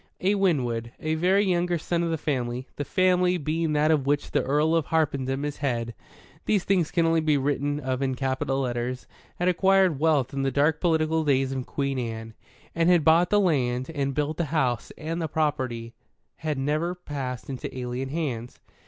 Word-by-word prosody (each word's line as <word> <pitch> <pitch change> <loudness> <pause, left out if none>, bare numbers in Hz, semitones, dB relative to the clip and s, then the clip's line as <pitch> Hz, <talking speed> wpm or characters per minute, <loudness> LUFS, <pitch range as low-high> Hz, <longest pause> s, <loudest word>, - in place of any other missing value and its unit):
A 195 +2 +2
Winwood, 125 - 0
a 155 0 -1
very 185 +5 +3
younger 175 -1 +1
son 170 +2 -1
of 170 - 0
the 165 - 0
Family 130 -4 -2
the 145 - -3
Family 180 +1 +2
being 160 0 -1
that 150 +1 +3
of 145 -4 +1
which 145 0 0
the - - +2
Earl 150 +4 +2
of 165 -3 +1
Harpenden 140 -3 0
is 145 -1 -4
Head 120 -5 -2 0.5
(these 205 -4 +2
things 180 -5 +1
can 170 -2 +1
only 165 0 +3
be 155 -2 +2
written 145 +1 -1
of 130 -2 -2
in 130 -1 0
capital 135 0 -1
letters) 125 0 -3 0.3
had 175 - -1
acquired 190 -3 +3
wealth 145 -5 +2
in 135 - -1
the 135 - +1
dark 145 +3 +1
political 160 -2 +2
days 135 -2 +2
of 130 -2 -4
Queen 140 -2 -2
Anne, 115 -2 -5 0.4
and 165 +1 +2
had 175 -4 +4
bought 165 +2 +5
the 205 - +4
land 130 -7 +1
and 140 -2 -1
built 150 +1 -1
the 170 - 0
house, 135 -7 -1
and 165 +2 -4
the 160 - -1
property 130 -7 -2 0.4
had 155 -2 -3
never 155 +6 -1
passed 135 -7 -5
into 135 -2 -5
alien 125 +1 -3
hands. 130 -6 -4
150 Hz, 190 wpm, -26 LUFS, 130-165 Hz, 0.5 s, bought